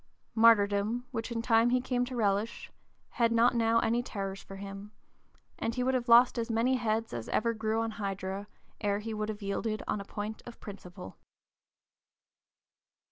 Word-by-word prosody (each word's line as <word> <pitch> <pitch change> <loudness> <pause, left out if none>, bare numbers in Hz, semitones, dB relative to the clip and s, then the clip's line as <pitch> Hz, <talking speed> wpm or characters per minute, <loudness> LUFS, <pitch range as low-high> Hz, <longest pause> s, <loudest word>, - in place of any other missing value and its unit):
Martyrdom, 220 +1 +4
which 225 +2 -4
in 230 -1 -2
time 230 0 +4
he 250 +1 +3
came 250 -1 0
to 255 0 -6
relish, 210 0 -1 0.4
had 235 -1 +1
not 230 +2 +4
now 230 -1 +3
any 235 +2 +1
terrors 195 -4 -5
for 195 - -11
him; 195 +1 -8 0.7
and 230 - -2
he 250 - 0
would 260 +1 +1
have 245 -1 -1
lost 240 +1 +7
as 230 +1 -2
many 235 +3 +2
heads 225 -1 -1
as 115 -2 -5
ever 230 +1 +1
grew 220 0 -1
on 225 0 -2
Hydra, 195 -1 -4 0.3
ere 205 -2 0
he 220 +2 -5
would 215 0 -3
have 210 -1 -5
yielded 215 +2 -2
on 205 - -1
a - - -6
point 210 +2 -6
of 240 - -10
principle. 180 - -10
225 Hz, 175 wpm, -30 LUFS, 200-235 Hz, 0.7 s, lost